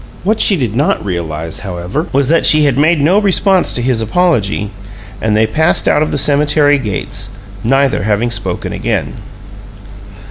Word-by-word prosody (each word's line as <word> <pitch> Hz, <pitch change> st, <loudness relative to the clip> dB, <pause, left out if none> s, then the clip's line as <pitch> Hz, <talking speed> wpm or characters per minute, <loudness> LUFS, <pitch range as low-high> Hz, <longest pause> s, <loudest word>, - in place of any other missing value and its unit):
What 215 Hz, +4 st, 0 dB
she 195 Hz, -, +5 dB
did 120 Hz, -7 st, -3 dB
not 140 Hz, -5 st, 0 dB
realize, 80 Hz, -3 st, -4 dB
however, 95 Hz, -, -4 dB
was 135 Hz, -1 st, +1 dB
that 165 Hz, +1 st, +2 dB
she 155 Hz, -1 st, +4 dB
had 140 Hz, -4 st, +1 dB
made 155 Hz, +4 st, +2 dB
no 170 Hz, +8 st, +3 dB
response 195 Hz, -2 st, +2 dB
to 120 Hz, -, -2 dB
his 125 Hz, -3 st, 0 dB
apology, 110 Hz, -, 0 dB, 0.5 s
and 110 Hz, -1 st, 0 dB
they 110 Hz, -, +3 dB
passed 160 Hz, +9 st, 0 dB
out 150 Hz, -, +2 dB
of 155 Hz, -, 0 dB
the -, -, -2 dB
cemetery 145 Hz, +1 st, +3 dB
gates, 105 Hz, -7 st, -4 dB, 0.3 s
neither 135 Hz, +3 st, +1 dB
having 110 Hz, +3 st, -1 dB
spoken 95 Hz, -6 st, -3 dB
again. -, -, -3 dB
135 Hz, 165 wpm, -13 LUFS, 105-155 Hz, 0.5 s, she